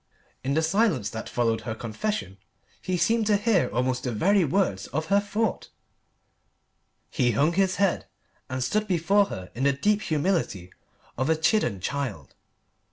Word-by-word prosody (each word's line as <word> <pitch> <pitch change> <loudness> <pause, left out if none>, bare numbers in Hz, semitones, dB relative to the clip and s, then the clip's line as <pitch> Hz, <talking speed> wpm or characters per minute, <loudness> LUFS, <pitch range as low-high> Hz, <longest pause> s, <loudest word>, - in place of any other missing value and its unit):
In 135 +2 -1
the 160 - +2
silence 190 - +1
that 110 0 -6
followed 115 -2 0
her 110 - -4
confession 110 - -4 0.4
he 185 0 -1
seemed 225 +3 +2
to 210 -1 +4
hear 205 -3 +2
almost 125 +1 -1
the 125 - -2
very 190 - +3
words 140 - 0
of 155 +5 -3
her 200 - +6
thought. 210 +2 -2 1.4
He 125 -5 +1
hung 145 +10 +2
his 190 0 +2
head 200 -3 0 0.4
and 130 0 -2
stood 210 - 0
before 195 +3 +3
her 95 - -8
in 125 - -4
the 140 0 +4
deep 205 +10 +1
humility 155 - -1 0.5
of 130 +3 0
a 160 - +4
chidden 155 - +1
child. 130 - -4
155 Hz, 160 wpm, -26 LUFS, 120-200 Hz, 1.4 s, her